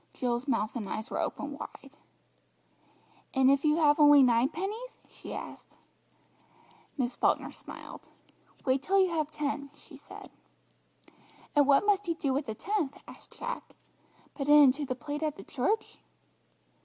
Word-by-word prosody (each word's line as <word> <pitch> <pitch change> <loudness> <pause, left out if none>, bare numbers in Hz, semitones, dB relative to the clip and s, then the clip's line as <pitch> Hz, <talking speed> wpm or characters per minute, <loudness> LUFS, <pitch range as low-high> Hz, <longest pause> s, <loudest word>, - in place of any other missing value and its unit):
Jill's 245 +1 -2
mouth 225 -4 -1
and 220 -5 -4
eyes 220 +3 -5
were - - -2
open 285 0 -3
wide. 275 +1 -10 1.4
"And 265 0 +5
if 275 0 +2
you 305 -1 +3
have 300 -2 +4
only 290 -2 +8
nine 240 +1 +3
pennies?" 425 +9 -5
she - - -11
asked. - - -9 1.2
Miss 255 -2 -1
Falkner - - +1
smiled. - - -11 0.6
"Wait 260 0 +2
till 390 +8 +2
you 375 -1 +4
have 310 -3 -1
ten," 285 -2 -3
she - - -15
said. - - -13 1.2
"And 290 -1 +5
what 285 +7 +5
must 410 -2 +2
you 335 - 0
do 275 -4 -1
with 280 +1 -2
the 220 - -4
tenth?" 360 - -3
asked - - -15
Jack; - - -6 0.6
"put 280 -1 -4
it 295 - +8
into 285 0 +5
the 255 - -2
plate 290 +4 -5
at 310 -2 -1
the 195 - -11
church?" 350 - -2
285 Hz, 155 wpm, -29 LUFS, 260-315 Hz, 1.4 s, only